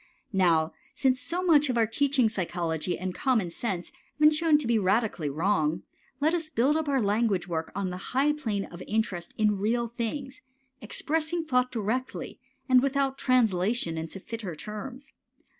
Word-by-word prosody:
Now 165 -4 +3 0.2
since 260 0 +2
so 350 +4 -3
much 300 -5 +4
of 245 - 0
our 230 - +4
teaching 265 +2 +2
psychology 175 -4 -2
and 185 0 -4
common 220 -9 +1
sense 180 -1 -4 0.3
have 305 +1 +7
shown 310 -1 +4
to 295 - -3
be 230 -1 +2
radically 200 -5 +1
wrong, 160 0 0 0.4
let 310 +3 +2
us 325 -3 -1
build 275 +1 +2
up 315 -2 0
our 275 -1 +2
language 205 -2 +1
work 160 -2 -3
on 195 -2 -2
the 180 - -5 0.2
high 290 +2 +4
plane 220 -10 -2
of 175 +1 -11
interest 205 -5 -2
in 210 -2 +2
real 235 +4 +1
things, 240 +4 -5 0.4
expressing 320 +8 -2
thought 250 -3 +1
directly 235 +3 -3 0.3
without 270 +1 +2
translation 220 -6 +2
into 160 +4 -5
fitter 205 -4 -6
terms. 245 - -7
230 Hz, 160 wpm, -28 LUFS, 185-275 Hz, 0.4 s, have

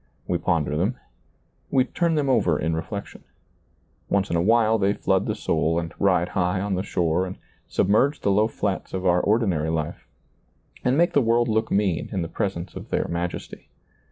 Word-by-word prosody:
We 90 - 0
ponder 80 -4 0
them. 95 +10 0 0.7
We 130 - +3
turn 170 +4 0
them 145 -2 +1
over 90 - +3
in 80 +1 -1
reflection. 100 +5 -6 0.9
Once 100 -1 +1
in - - +1
a 85 - +2
while 110 +2 +3
they 100 0 +2
flood 95 -2 0
the 105 - -1
soul 80 -5 0
and 80 -1 -3
ride 90 -3 +2
high 90 +1 0
on 100 +1 -2
the 95 - 0
shore 90 -1 0
and 95 - -7 0.3
submerge 130 +9 +2
the 100 - +2
low 105 +3 +3
flats 100 -4 -3
of 95 0 -3
our 90 -1 +4
ordinary 95 -8 +1
life 80 -2 -3 0.8
and 125 +2 +2
make 170 +1 +3
the 145 - +4
world 120 0 +2
look 110 0 0
mean 95 -6 0
in 95 -5 -1
the - - -4
presence 90 -1 -3
of - - -8
their - - 0
majesty. 85 +1 -5
95 Hz, 185 wpm, -24 LUFS, 85-110 Hz, 0.9 s, our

